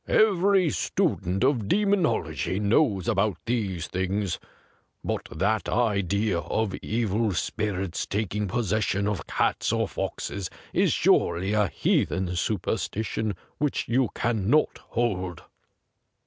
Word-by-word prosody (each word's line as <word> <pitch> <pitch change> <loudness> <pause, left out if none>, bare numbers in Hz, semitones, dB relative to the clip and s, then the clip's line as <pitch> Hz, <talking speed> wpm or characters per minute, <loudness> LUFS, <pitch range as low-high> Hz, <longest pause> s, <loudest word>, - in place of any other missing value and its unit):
Every 195 -4 +4
student 95 -3 0
of 130 -6 +2
demonology 160 - +1
knows 105 - +2
about 105 -4 +1
these 100 -8 -1
things. 95 +1 -2 0.3
' - - -36 0.3
But - - -3
that 105 +6 0
idea 100 -4 +1
of 110 +3 -1
evil 110 -1 0
spirits 95 -3 -2
tak 105 -1 -2
ing 105 0 -1
possession 105 -1 0
of 105 -3 -2
cats - - 0
or - - +1
foxes 95 -3 -4 0.2
is - - +3
surely 90 +4 +2
a 105 -1 +3
heathen 90 0 0
superstition 105 +2 -1 0.2
which 150 -2 0
you 125 -1 +2
cannot 120 +5 +1
hold.' 95 -8 -2
105 Hz, 115 wpm, -26 LUFS, 95-115 Hz, 0.3 s, Every